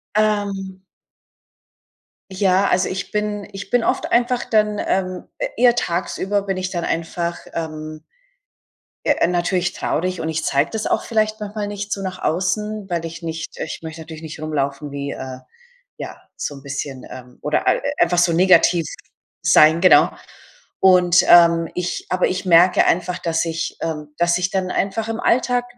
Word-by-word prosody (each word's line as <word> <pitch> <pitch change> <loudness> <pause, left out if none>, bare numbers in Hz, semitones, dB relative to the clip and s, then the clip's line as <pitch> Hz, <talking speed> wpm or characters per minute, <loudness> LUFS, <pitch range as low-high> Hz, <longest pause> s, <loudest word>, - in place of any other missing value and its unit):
Ähm. 200 -3 -1 1.5
Ja, 190 0 +2
also, 180 +1 +2
ich 185 0 -5
bin 210 -1 -2
ich 195 0 -8
bin 245 -2 +3
oft - - -1
einfach 240 +1 +2
dann, 210 -1 +1
ähm, 185 -1 -1 0.3
eher 240 0 +5
tagsüber 190 +1 -1
bin 195 -1 -2
ich 185 0 -2
dann 175 -2 -3
einfach, 170 +1 -2
ähm 155 -1 -5 1.0
ja, - - +3
natürlich 180 0 0
traurig 180 +2 -2
und 160 - -3
ich 160 -1 -2
zeige 140 +2 +1
das 220 -1 -3
auch - - 0
vielleicht 215 -1 0
manchmal 210 0 -4
nicht 205 0 -4
so 195 - -4
nach 185 -1 -5
außen, 200 +4 -1
weil 170 -1 -2
ich 165 +1 -7
nicht 165 0 -6
ich - - -5
möchte 160 0 -8
natürlich 160 0 -10
nicht 155 0 -8
rumlaufen 145 -2 -3
wie, 140 0 -4
äh, 130 -1 -7 0.6
ja - - -7 0.2
so 145 - -4
'n 135 - -12
bisschen, 140 -2 -5
ähm 125 -1 -11
oder 150 - 0
e - - +3 0.2
einfach 175 +1 +3
so 175 -1 +3
negativ 175 -1 +4 0.6
sein, 155 +2 +5
genau. 185 - +6 0.7
Und, 180 -1 +5
ähm, 170 -1 +6
ich 180 0 -3
aber 185 0 +2
ich 185 +1 -3
merke 175 +1 +5
einfach, 180 +1 0
dass 165 0 0
ich, 165 0 -3
ähm 150 -2 -4
dass 170 0 +2
ich 180 0 -1
dann 190 -1 -1
einfach 215 +3 -1
im 225 - -3
Alltag 245 0 +2
180 Hz, 165 wpm, -20 LUFS, 160-200 Hz, 1.5 s, genau